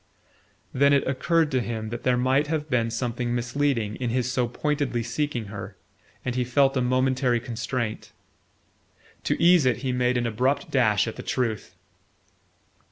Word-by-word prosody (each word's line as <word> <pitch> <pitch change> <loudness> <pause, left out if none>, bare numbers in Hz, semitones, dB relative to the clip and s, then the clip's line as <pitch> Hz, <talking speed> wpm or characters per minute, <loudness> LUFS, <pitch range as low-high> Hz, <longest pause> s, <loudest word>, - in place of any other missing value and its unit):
Then 140 +2 +4
it 140 - +3
occurred 155 +4 +1
to 130 -2 +1
him 110 -2 -4
that 120 +1 -5
there 125 -1 +2
might 130 +4 +2
have 155 -1 -3
been 115 -2 +2
something 120 +1 -2
misleading 120 -3 -1
in 125 -2 -2
his 125 +1 0
so 125 -1 +1
pointedly 140 -2 -1
seeking 120 0 -2
her, 100 -1 -8 0.5
and 125 - -1
he 125 0 0
felt 135 +3 +2
a 130 - +1
momentary 130 -1 +1
constraint. 115 -1 -4 1.1
To - - 0
ease 175 -5 +5
it 125 - +2
he 130 - +1
made 125 0 +1
an 120 - 0
abrupt 130 +5 0
dash 120 -5 +3
at 110 - -5
the - - -5
truth. 115 -5 -2
125 Hz, 165 wpm, -25 LUFS, 120-135 Hz, 1.1 s, ease